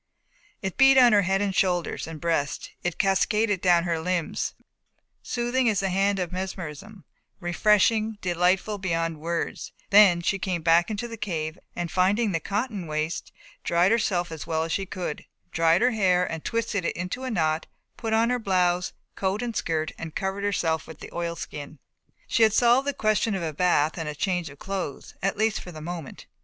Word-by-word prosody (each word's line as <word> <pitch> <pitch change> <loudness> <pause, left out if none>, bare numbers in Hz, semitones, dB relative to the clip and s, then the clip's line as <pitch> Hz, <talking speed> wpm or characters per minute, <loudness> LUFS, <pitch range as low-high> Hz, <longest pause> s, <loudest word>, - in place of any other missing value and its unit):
It 190 -1 -3
beat 270 0 +7
on 245 -3 +7
her 205 - +6
head 195 +1 +1
and 200 -1 -1
shoulders 180 -4 0
and 160 -1 -7
breast, 165 -4 -1
it 175 -2 -2
cascaded 205 0 +2
down 175 -2 +4
her 170 -2 -1
limbs, 175 0 -2 0.7
soothing 240 +1 0
as 205 -4 +1
the 195 - 0
hand 195 +2 +2
of 180 -3 -2
mesmerism, 185 +1 -6 0.4
refreshing, 210 +4 +2
delightful 185 +3 +1
beyond 165 -4 -1
words, 170 +2 -3 0.2
then 195 -4 +7
she 195 +3 0
came 180 -4 -2
back 170 +3 +4
into 215 +2 -3
the 230 -1 -8
cave 165 -5 -3 0.2
and, 175 -1 -3
finding 195 +4 +2
the 165 - 0
cotton 205 0 -3
waste, 155 +2 -3 0.3
dried 175 +3 +3
herself 185 -7 +1
as 160 -2 -7
well 160 0 0
as 165 - -4
she 195 +2 -1
could, 175 -5 -5 0.3
dried 165 +4 +3
her 250 - +4
hair 185 -5 +2
and 160 -1 -5
twisted 230 -4 -1
it - - -1
into 180 +9 -4
a 260 - -2
knot, 160 -7 0 0.3
put 225 -2 -4
on 225 +2 +3
her 250 - +1
blouse, 180 -4 +1 0.2
coat 195 +4 -1
and 235 -2 -4
skirt 160 -1 -1
and 160 -1 -7
covered 195 +1 -2
herself 165 -6 0
with 160 - -11
the - - -10
oilskin. 170 -3 -5 0.5
She - - 0
had 220 -2 +6
solved 245 +4 +4
the 285 - +1
question 215 -2 +1
of 185 - -3
a 160 -2 -3
bath 160 -1 +2
and 150 -2 -4
change 180 -4 -1
of 140 - -13
clothes, 185 -5 -5
at 195 +1 0
least 220 -1 +1
for 180 - -9
the 155 - -9
moment. 165 -2 -7
185 Hz, 185 wpm, -26 LUFS, 165-210 Hz, 0.7 s, beat